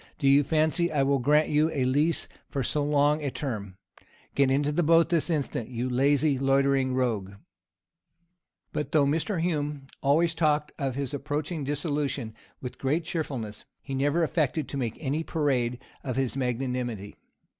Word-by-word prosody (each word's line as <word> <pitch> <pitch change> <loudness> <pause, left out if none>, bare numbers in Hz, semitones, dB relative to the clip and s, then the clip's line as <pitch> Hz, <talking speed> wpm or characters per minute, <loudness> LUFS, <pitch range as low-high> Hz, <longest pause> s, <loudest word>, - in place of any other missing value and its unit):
Do 140 - 0
you 140 +1 +6
fancy 160 +4 +1
I 145 -3 +2
will 140 0 +2
grant 150 +5 +3
you 150 +2 +3
a 145 -5 -1
lease 145 +6 +1 0.2
for 135 -2 -2
so 150 +4 0
long 145 +1 +3
a 145 - -1
term? 105 -9 -5 0.6
Get 140 -1 +3
into 140 +2 +2
the 155 - +1
boat 165 +1 +4
this 170 -1 +1
instant, 140 -7 -2
you 125 0 -2
lazy, 140 +2 +2
loitering 135 -1 +2
rogue.'" 110 -7 -1 1.4
But, 150 - -3
though 150 -3 +5
Mr. 165 +6 0
Hume 150 -4 -1 0.2
always 160 +4 +3
talked 150 -2 +1
of 135 -3 -1
his 140 0 -3
approaching 150 +3 -3
dissolution 145 -4 -2 0.3
with 125 - -7
great 150 +5 0
cheerfulness, 130 -11 -4 0.2
he 135 - -6
never 145 +5 +2
affected 155 -2 0
to 140 - -4
make 120 -4 -2
any 150 +1 -1
parade 130 -7 0 0.3
of 130 -3 -3
his 135 -2 0
magnanimity. 125 -5 -2
140 Hz, 160 wpm, -27 LUFS, 130-150 Hz, 1.4 s, you